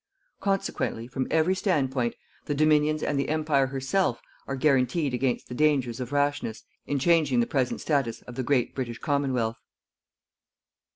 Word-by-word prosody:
Consequently, 195 Hz, -, -1 dB
from 130 Hz, +1 st, -3 dB
every 160 Hz, +3 st, +3 dB
standpoint 135 Hz, -, 0 dB, 0.3 s
the 145 Hz, -, -1 dB
Dominions 155 Hz, 0 st, +3 dB
and 145 Hz, -, 0 dB
the 140 Hz, -, -1 dB
Empire 150 Hz, -3 st, +2 dB
herself 135 Hz, +2 st, 0 dB, 0.3 s
are 135 Hz, -, -2 dB
guaranteed 135 Hz, +1 st, +2 dB
against 125 Hz, 0 st, -1 dB
the -, -, -7 dB
dangers 135 Hz, -4 st, +1 dB
of 125 Hz, 0 st, -5 dB
rashness 145 Hz, -5 st, -1 dB, 0.2 s
in 145 Hz, -, 0 dB
changing 150 Hz, -3 st, +3 dB
the 120 Hz, -, +3 dB
present 130 Hz, -2 st, -1 dB
status 135 Hz, -7 st, 0 dB
of 125 Hz, -, -10 dB
the 130 Hz, -, -3 dB
great 130 Hz, -1 st, +1 dB
British 120 Hz, -3 st, -4 dB
Commonwealth. 130 Hz, -6 st, -1 dB
135 Hz, 150 wpm, -27 LUFS, 125-150 Hz, 0.3 s, every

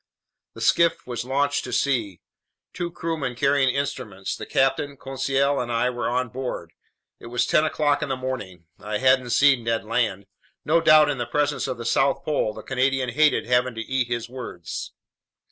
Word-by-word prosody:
The -, -, -9 dB
skiff 170 Hz, -1 st, +3 dB
was 120 Hz, -1 st, -4 dB
launched 140 Hz, +2 st, 0 dB
to 125 Hz, -, -6 dB
sea. 120 Hz, -8 st, 0 dB, 0.5 s
Two 175 Hz, -1 st, -3 dB
crewmen 160 Hz, -6 st, -3 dB
carrying 135 Hz, +1 st, +2 dB
instruments, 125 Hz, -8 st, -3 dB
the -, -, -8 dB
captain, 135 Hz, +1 st, +1 dB
Conseil, 135 Hz, +1 st, 0 dB
and 120 Hz, -1 st, -3 dB
I 120 Hz, +2 st, +1 dB
were 120 Hz, -1 st, -2 dB
on 125 Hz, 0 st, -1 dB
board. 125 Hz, -9 st, -5 dB, 0.5 s
It -, -, -11 dB
was 120 Hz, 0 st, 0 dB
ten 155 Hz, -, +3 dB
o'clock 150 Hz, -2 st, +1 dB
in 145 Hz, -, -3 dB
the 135 Hz, -, 0 dB
morning. 115 Hz, -10 st, -6 dB
I 105 Hz, +1 st, -3 dB
hadn't 130 Hz, 0 st, +3 dB
seen 135 Hz, 0 st, +4 dB
Ned 115 Hz, 0 st, -1 dB
Land. 110 Hz, -4 st, -1 dB, 0.4 s
No 165 Hz, +2 st, +3 dB
doubt, 155 Hz, -2 st, +6 dB
in 135 Hz, -, -4 dB
the 120 Hz, -, -2 dB
presence 145 Hz, 0 st, 0 dB
of 130 Hz, -2 st, -3 dB
the 115 Hz, -, -7 dB
South 135 Hz, +4 st, +2 dB
Pole, 145 Hz, -8 st, 0 dB
the -, -, -9 dB
Canadian 135 Hz, 0 st, 0 dB
hated 150 Hz, +5 st, +3 dB
having 125 Hz, 0 st, +1 dB
to 115 Hz, -, -4 dB
eat 130 Hz, +1 st, -1 dB
his 120 Hz, -1 st, -3 dB
words. 120 Hz, -9 st, -7 dB
130 Hz, 180 wpm, -24 LUFS, 120-140 Hz, 0.5 s, doubt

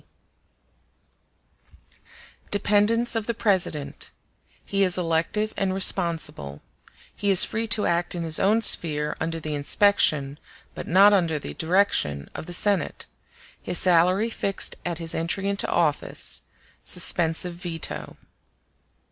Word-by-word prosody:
] -, -, -29 dB
Dependence 210 Hz, +4 st, +1 dB
of 225 Hz, -2 st, -3 dB
the 235 Hz, -, -2 dB
President—He 195 Hz, 0 st, -4 dB
is 185 Hz, -2 st, +1 dB
elective 175 Hz, +5 st, -1 dB
and 190 Hz, -1 st, -2 dB
responsible—He 170 Hz, -, -1 dB
is 190 Hz, -2 st, +7 dB
free 225 Hz, +1 st, -3 dB
to 220 Hz, -1 st, +1 dB
act 175 Hz, +1 st, -1 dB
in 170 Hz, -, -4 dB
his 160 Hz, -1 st, +1 dB
own 215 Hz, +4 st, +2 dB
sphere 150 Hz, -6 st, +3 dB
under 165 Hz, +1 st, -3 dB
the 155 Hz, -1 st, -5 dB
inspection, 145 Hz, -2 st, +2 dB, 0.3 s
but -, -, -8 dB
not 195 Hz, +4 st, +5 dB
under 170 Hz, -5 st, +1 dB
the 145 Hz, -, -8 dB
direction, 160 Hz, -, 0 dB
of -, -, -8 dB
the 175 Hz, -, -6 dB, 1.1 s
Senate—His 180 Hz, -, -2 dB
salary 185 Hz, +5 st, +2 dB
fixed 200 Hz, -3 st, -2 dB
at 175 Hz, -2 st, -4 dB
his 165 Hz, -1 st, -4 dB
entry 170 Hz, +4 st, -2 dB
into 200 Hz, 0 st, 0 dB
office—Suspensive 165 Hz, +1 st, 0 dB
veto. 170 Hz, -2 st, -4 dB
175 Hz, 115 wpm, -24 LUFS, 160-200 Hz, 1.1 s, is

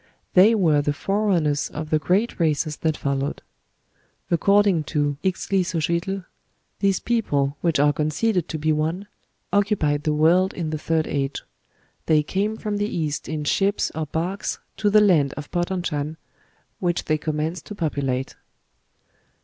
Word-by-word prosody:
They 205 Hz, +5 st, +7 dB
were 160 Hz, -8 st, +3 dB
the 145 Hz, 0 st, 0 dB
forerunners 175 Hz, -6 st, 0 dB
of 155 Hz, +1 st, -6 dB
the 155 Hz, -, +3 dB
great 190 Hz, +10 st, 0 dB
races 155 Hz, -2 st, 0 dB
that 160 Hz, -2 st, -1 dB
followed. 140 Hz, +1 st, -2 dB, 0.9 s
According 200 Hz, -2 st, +3 dB
to 145 Hz, -1 st, -1 dB
Ixtlilxochitl, 185 Hz, 0 st, -1 dB, 0.5 s
these 195 Hz, -2 st, +2 dB
people 145 Hz, -12 st, 0 dB
which 165 Hz, -5 st, +1 dB
are 145 Hz, 0 st, +4 dB
conceded 160 Hz, +6 st, 0 dB
to 160 Hz, -, -3 dB
be 155 Hz, +1 st, 0 dB
the 150 Hz, -, +1 dB
ones 165 Hz, +6 st, -1 dB, 0.5 s
who -, -, +3 dB
occupied 155 Hz, -8 st, +1 dB
the 155 Hz, -1 st, +1 dB
world 175 Hz, +5 st, +3 dB
in 165 Hz, -3 st, -3 dB
the 155 Hz, -, -3 dB
third 160 Hz, 0 st, 0 dB
age; 140 Hz, -1 st, -2 dB, 0.6 s
they 155 Hz, -1 st, +4 dB
came 205 Hz, +7 st, -1 dB
from 210 Hz, -2 st, -3 dB
the 205 Hz, 0 st, 0 dB
East 155 Hz, -3 st, -3 dB
in 155 Hz, -1 st, -3 dB
ships 195 Hz, +7 st, +1 dB
or 160 Hz, -1 st, -3 dB
barks 175 Hz, +7 st, -2 dB, 0.2 s
to 210 Hz, -, +2 dB
the 210 Hz, +1 st, +6 dB
land 160 Hz, -9 st, +4 dB
of 145 Hz, -1 st, -7 dB
Potonchan, 175 Hz, -4 st, -2 dB, 0.6 s
which 175 Hz, -1 st, -1 dB
they 155 Hz, 0 st, +1 dB
commenced 155 Hz, +2 st, -3 dB
to 210 Hz, -, -7 dB
populate." 140 Hz, -7 st, -2 dB
160 Hz, 150 wpm, -23 LUFS, 150-190 Hz, 0.9 s, They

